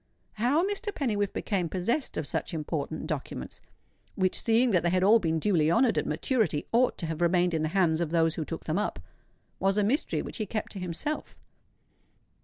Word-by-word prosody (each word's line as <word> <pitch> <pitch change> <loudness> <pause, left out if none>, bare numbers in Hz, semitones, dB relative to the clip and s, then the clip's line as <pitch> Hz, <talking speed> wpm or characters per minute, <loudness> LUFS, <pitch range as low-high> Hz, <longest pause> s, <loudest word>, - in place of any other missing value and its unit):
How 270 - +2
Mr. 410 +1 -2
Pennywhiffe 210 - -1
became 185 -6 -1
possessed 215 - -1
of 155 - -2
such 165 - -3
important 155 0 -3
documents,—which, 155 - -5
seeing 235 +2 +3
that 180 -4 +3
they 175 - +1
had 185 +1 +2
all 215 +4 +6
been 165 -4 0
duly 160 -3 +2
honoured 230 +8 +3
at - - 0
maturity, 220 - 0
ought 245 +2 +3
to - - -2
have 160 0 -4
remained 175 0 +3
in 160 - 0
the 155 - +1
hands 165 -3 +3
of 170 - -1
those 165 -1 +2
who 160 - -3
took 165 +2 -6
them 160 +5 -1
up,—was 195 -1 -4
a 210 - +3
mystery 250 +9 0
which - - -6
he 215 -3 -3
kept 215 +2 -3
to 195 - -7
himself. 180 - -4
185 Hz, 190 wpm, -28 LUFS, 165-225 Hz, -, all